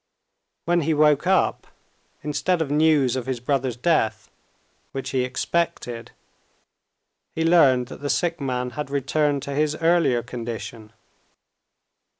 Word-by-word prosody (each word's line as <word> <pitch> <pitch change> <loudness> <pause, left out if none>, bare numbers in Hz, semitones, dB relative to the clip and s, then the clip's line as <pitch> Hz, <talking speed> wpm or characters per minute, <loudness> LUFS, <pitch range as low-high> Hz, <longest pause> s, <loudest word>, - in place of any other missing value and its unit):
When 175 0 +2
he 160 +1 0
woke 150 +1 +3
up, 190 0 +1 0.6
instead 150 +5 0
of 155 -3 -2
news 150 -4 +3
of 130 -1 -4
his 130 -2 -2
brother's 130 -1 -1
death 125 -4 0 0.6
which 135 - -4
he 130 -2 +1
expected, 130 -3 -2 1.2
he 160 - -1
learned 140 -7 +5
that - - -10
the 145 - -3
sick 170 0 0
man 125 -2 -2
had 145 +3 -5
returned 140 0 0
to 140 - -5
his 150 +1 +1
earlier 165 -7 +2
condition. 115 -3 -7
140 Hz, 130 wpm, -23 LUFS, 125-160 Hz, 1.2 s, learned